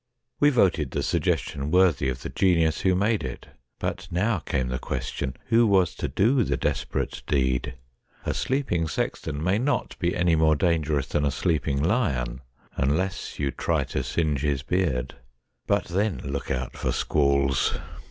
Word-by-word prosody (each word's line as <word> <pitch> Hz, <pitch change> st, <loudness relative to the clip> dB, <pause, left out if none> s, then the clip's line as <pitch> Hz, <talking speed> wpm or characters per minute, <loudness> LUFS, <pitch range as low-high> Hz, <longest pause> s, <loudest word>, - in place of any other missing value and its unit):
We 145 Hz, -, +6 dB
voted 90 Hz, -, +2 dB
the -, -, -2 dB
suggestion 80 Hz, -4 st, -1 dB
worthy 90 Hz, -6 st, +3 dB
of 65 Hz, -1 st, -4 dB
the -, -, -4 dB
genius 85 Hz, -4 st, +2 dB
who 95 Hz, -1 st, +3 dB
made 105 Hz, +3 st, +1 dB
it. 65 Hz, -2 st, -7 dB, 0.3 s
But -, -, -4 dB
now 95 Hz, +3 st, +1 dB
came 65 Hz, -5 st, -2 dB
the 65 Hz, +1 st, -2 dB
question, 65 Hz, -, -4 dB
who 115 Hz, 0 st, +5 dB
was 95 Hz, -4 st, +3 dB
to -, -, -3 dB
do 120 Hz, +5 st, +3 dB
the -, -, -1 dB
desperate -, -, -2 dB
deed? 65 Hz, -1 st, 0 dB, 0.5 s
A -, -, 0 dB
sleeping 125 Hz, -, 0 dB
sexton 80 Hz, -1 st, -3 dB
may 95 Hz, +4 st, +2 dB
not 145 Hz, +4 st, -1 dB
be 85 Hz, -1 st, 0 dB
any 85 Hz, -1 st, +3 dB
more 80 Hz, -1 st, +4 dB
dangerous 75 Hz, -4 st, +1 dB
than 75 Hz, -, -1 dB
a 70 Hz, -, +2 dB
sleeping 75 Hz, -1 st, 0 dB
lion 70 Hz, -, 0 dB, 0.3 s
unless 80 Hz, +8 st, -1 dB
you 70 Hz, -2 st, -1 dB
try -, -, 0 dB
to -, -, 0 dB
singe 75 Hz, -5 st, -1 dB
his 70 Hz, -2 st, 0 dB
beard. 75 Hz, -8 st, -1 dB, 0.5 s
But -, -, +2 dB
then 95 Hz, +2 st, 0 dB
look 70 Hz, 0 st, -4 dB
out 65 Hz, -1 st, -3 dB
for -, -, -1 dB
squalls 70 Hz, -3 st, +2 dB
80 Hz, 160 wpm, -25 LUFS, 70-95 Hz, 0.5 s, We